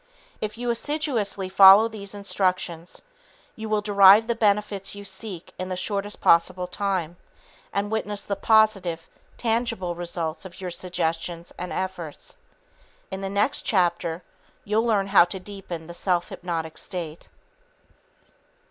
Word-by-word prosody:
If 215 0 -3
you 240 0 -1
assiduously 235 -7 -2
follow 195 +3 +8
these 205 -3 -9
instructions, 185 -4 -2 0.5
you 220 -1 -6
will 215 -1 +1
derive 200 +1 +7
the 235 - 0
benefits 205 -2 0
you 205 0 -9
seek 190 -2 -8
in 185 0 -4
the 185 - -2
shortest 200 +2 -3
possible 180 +2 +3
time 180 -2 -2 0.5
and 200 +1 -2
witness 210 -2 -2
the 200 - -2
positive, 195 -7 +2 0.3
tangible 225 -6 -1
results 170 -1 -4
of 190 -2 -11
your 185 -2 -5
suggestions 170 -1 -3
and 180 0 -6
efforts. 180 - -5 0.8
In 190 - -5
the 195 - -3
next 205 +8 +1
chapter, 175 -3 0 0.4
you'll 220 +3 +1
learn 205 -4 +2
how 195 -3 +6
to 185 +2 -6
deepen 185 -4 -8
the 170 - -9
self 175 0 0
hypnotic 165 -3 -4
state. 170 -5 -5
195 Hz, 135 wpm, -25 LUFS, 175-210 Hz, 0.8 s, follow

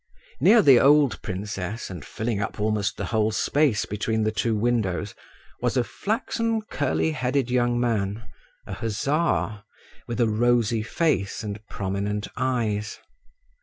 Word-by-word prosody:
Near 225 -1 +6
the 135 -6 +7
old 145 -1 +4
princess, 100 +2 -5
and 85 -6 -7
filling 110 - -3
up 100 - -4
almost 105 -1 0
the - - -3
whole 110 -1 +1
space 135 +1 +1
between 110 +2 -1
the 110 - +1
two 110 +1 0
windows, 105 -4 0 0.5
was - - 0
a 125 - +3
flaxen 225 - -2
curly 150 -4 0
headed 130 -3 -1
young 120 -1 +2
man, 110 -2 -1 0.4
a - - -6
hussar, 115 -1 -1 0.5
with 120 0 -4
a 120 - +4
rosy 115 0 +2
face 115 - -1
and 105 -1 -5
prominent 100 +2 -3
eyes. 115 -5 -1
115 Hz, 135 wpm, -25 LUFS, 105-130 Hz, 0.5 s, the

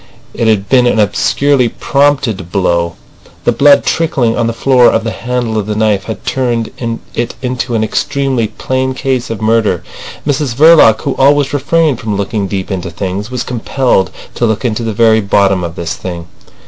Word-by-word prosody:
It 115 - -1
had 100 -3 +1
been 125 +2 +4
an 120 - +1
obscurely 125 +5 +2
prompted 135 - 0
blow. 85 -3 0 0.5
The - - +2
blood 140 +5 +4
trickling 130 -8 0
on 115 - 0
the - - 0
floor 125 +1 +4
off 110 - 0
the 115 - -2
handle 120 -2 -2
of 105 - -4
the 105 - -2
knife 105 -3 +1
had 110 +3 -7
turned 120 -3 -1 0.4
it 120 0 -3
into 125 -1 -2
an 110 - +1
extremely 130 +1 -1
plain 130 +3 -2
case 130 -2 -2
of 110 -1 -5
murder. 110 -5 +1 0.4
Mrs 145 -4 -1
Verloc, 155 -6 +6
who - - -1
always 140 +1 +3
refrained 150 -2 +1
from 105 -3 -3
looking 100 0 -2
deep 95 +1 -4
into 90 -2 -3
things, 95 +5 -4
was 125 -1 -3
compelled 125 -4 0 0.2
to 120 - 0
look 110 +3 -2
into 115 -1 -1
the 115 -1 -2
very 110 +1 +3
bottom 100 -2 +2
of 85 -1 -5
this 85 -1 -4
thing. 85 -2 -6
115 Hz, 180 wpm, -13 LUFS, 100-130 Hz, 0.5 s, Verloc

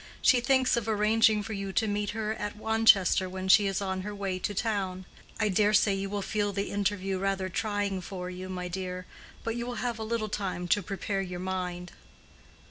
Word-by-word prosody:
She 250 -2 +6
thinks 260 0 +3
of 230 -2 -2
arranging 215 0 +3
for 220 +1 -5
you 195 -1 -4
to 220 - +2
meet 205 0 -1
her 215 0 -2
at 210 -1 -5
Wanchester 220 -4 +4
when 185 0 -5
she 200 +1 +6
is 195 +1 -1
on 190 -1 -2
her 205 +2 -5
way 195 -2 -2
to 205 +3 -3
town. 190 -4 -1 0.3
I 215 - +2
dare 210 +2 +3
say 210 -1 +4
you 195 0 -2
will 200 0 -2
feel 205 0 0
the 200 +1 -3
interview 195 -1 -1
rather 195 -1 -1
trying 205 -1 -1
for 180 0 -6
you, 185 +1 -7
my 180 -1 -4
dear; 180 0 -4 0.4
but 230 0 -2
you 240 0 -3
will 245 - -4
have 240 -2 -2
a - - -3
little 220 0 -1
time 190 -4 -3
to 205 - +3
prepare 195 +1 -3
your 180 -2 -5
mind." 180 -1 -4
200 Hz, 210 wpm, -29 LUFS, 185-215 Hz, 0.4 s, She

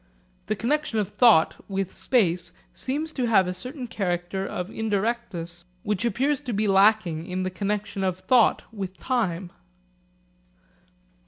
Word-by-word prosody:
The 215 - 0
connexion 245 +3 -1
of 210 -2 0
thought 210 -6 +4
with 195 -1 -3
space 180 -8 +1 0.2
seems 305 +4 -3
to 250 -3 -1
have 200 -5 +5
a 180 - -2
certain 250 +8 -6
character 190 -3 -2
of 180 +3 -4
indirectness 205 -5 -2 0.2
which 210 +1 -1
appears 275 +4 +1
to 255 -5 -4
be 210 +1 +1
lacking 195 -4 +3
in 185 0 -2
the 185 - -2
connexion 200 +1 -2
of 185 -1 0
thought 240 +4 +3
with 190 -3 -5
time. 190 -9 -1
205 Hz, 140 wpm, -25 LUFS, 185-235 Hz, 0.2 s, have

